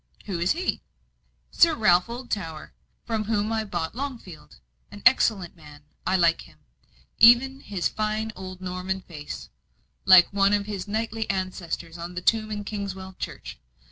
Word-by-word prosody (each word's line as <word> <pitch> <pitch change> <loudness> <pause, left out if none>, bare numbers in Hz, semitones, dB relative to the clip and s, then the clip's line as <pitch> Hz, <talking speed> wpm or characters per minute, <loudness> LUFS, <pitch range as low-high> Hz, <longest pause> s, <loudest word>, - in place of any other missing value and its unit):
"Who 190 -4 -3
is 175 +2 +2
he?" 355 +4 -2 0.7
"Sir 335 -2 +5
Ralph 180 -6 +4
Oldtower, 205 -10 -5 0.3
from 220 -2 -2
whom 215 0 0
I 220 -1 0
bought 175 -6 -4
Longfield. 235 - -7 0.3
An 205 - -12
excellent 210 -9 +3
man 150 -3 -15 0.2
I 185 - +2
like 170 -2 +3
him - - -16 0.6
even 245 +4 +7
his 200 -8 -2
fine 215 +1 -2
old 185 0 -9
Norman 185 +1 -3
face, 155 -5 -9 0.6
like 185 -2 +8
one 200 0 +3
of 205 -1 +1
his 200 -3 -5
knightly 220 +1 -3
ancestors 175 -3 -4
on 175 +1 -7
the 180 - -3
tomb 220 +1 +2
in 210 -1 -4
Kingswell 195 -2 -6
church. - - -7
195 Hz, 150 wpm, -25 LUFS, 180-220 Hz, 0.7 s, like